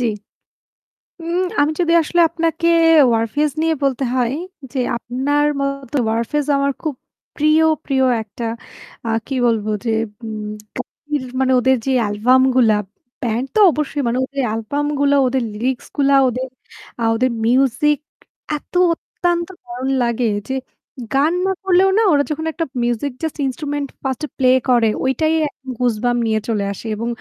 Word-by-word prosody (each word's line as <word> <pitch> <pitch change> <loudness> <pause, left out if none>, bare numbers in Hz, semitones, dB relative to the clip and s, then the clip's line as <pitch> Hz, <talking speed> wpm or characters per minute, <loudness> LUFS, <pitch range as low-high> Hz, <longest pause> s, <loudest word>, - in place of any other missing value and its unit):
জি। 245 - 0 1.2
উম 345 +3 -1 0.2
আমি 290 +2 +2
যদি 335 -1 +2
আসলে 345 +2 +1
আপনাকে 330 0 -1 0.5
Warfaze 240 +6 0
নিয়ে 325 0 +2
বলতে 275 -1 0
হয় 245 -1 +1 0.4
যে 270 - -1 0.2
আপনার 285 +5 0
মতো 275 0 -3
Warfaze 235 +6 -1
আমার 280 0 +1
খুব 310 -4 -3 0.4
প্রিয়, 305 +1 +4 0.2
প্রিয় 265 -2 +1 0.2
একটা 220 +2 -7 0.6
আ - - 0 0.2
কি 270 - -3
বলবো 215 -2 0 0.2
যে - - 0 0.3
উম 215 -1 -5 0.3
ka - - -1 0.6
মানে 260 0 +2
ওদের 260 +1 +3
যে 270 - 0
অ্যালবাম 220 +5 +3
গুলা 230 -4 +5 0.5
ব্যান্ড 235 +1 -1
তো - - +3
অবশ্যই 300 -1 -2
মানে 235 +1 0
ওদের 275 +1 -4
অ্যালবাম 225 +7 -2
গুলো, 285 0 +3
ওদের 255 0 0
লিরিক্স 245 +4 -2
গুলা 280 -1 +4
ওদের 255 +1 -2 0.5
আ - - 0
ওদের 255 +2 +1
মিউজিক, 270 +4 +2 0.6
এত - - -20 0.2
অত্যন্ত 345 0 -2 0.2
দারুণ 245 +2 -5
লাগে 235 0 0 0.2
যে 265 - -2 0.6
গান 290 +5 +3
না 385 - +2
করলেও 380 0 +4
না - - +5
ওরা 285 -1 +4
যখন 315 +1 -3
একটা 330 +1 -3 0.2
মিউজিক 240 +4 -1
just 320 - -3
instrument 285 +2 -3
ফার্স্ট 265 0 -3
এ - - -29
প্লে 255 -2 +3 0.2
করে, 235 -3 +4
ঐটাই 310 +5 +1 0.4
goosebump 245 0 0
নিয়ে 220 -1 +1
চলে 210 -4 0
আসে। 200 - -11
এবং 230 +2 -4
265 Hz, 150 wpm, -19 LUFS, 235-295 Hz, 1.2 s, গুলা